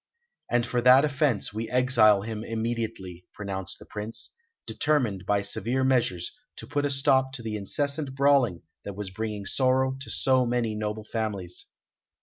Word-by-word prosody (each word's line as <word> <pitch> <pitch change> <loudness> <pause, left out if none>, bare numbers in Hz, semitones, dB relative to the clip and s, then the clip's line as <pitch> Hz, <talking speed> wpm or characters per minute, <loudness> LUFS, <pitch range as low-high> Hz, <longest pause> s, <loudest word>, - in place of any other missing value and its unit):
"And 120 -1 +2
for 125 0 -1
that 130 +3 +7
offence 140 -8 0
we 110 +1 -4
exile 120 -5 +4
him 110 0 -5
immediately," 110 -6 -4
pronounced 95 -3 -5
the - - -14
Prince, 105 +2 -5 0.3
determined 115 -11 0
by 100 -1 +2
severe 120 +6 -1
measures 120 -10 +1 0.2
to - - -9
put 145 -1 -1
a - - +1
stop 135 -1 +2
to 120 - -5
the 110 -1 -3
incessant 140 +7 -2
brawling 135 -10 +3 0.2
that 100 - -7
was 100 -2 -5
bringing 105 0 -4
sorrow 130 +3 +2
to 135 - -8
so 130 -1 +2
many 120 -2 0
noble 105 0 -3
families. 105 -6 -4
115 Hz, 155 wpm, -27 LUFS, 105-130 Hz, 0.3 s, that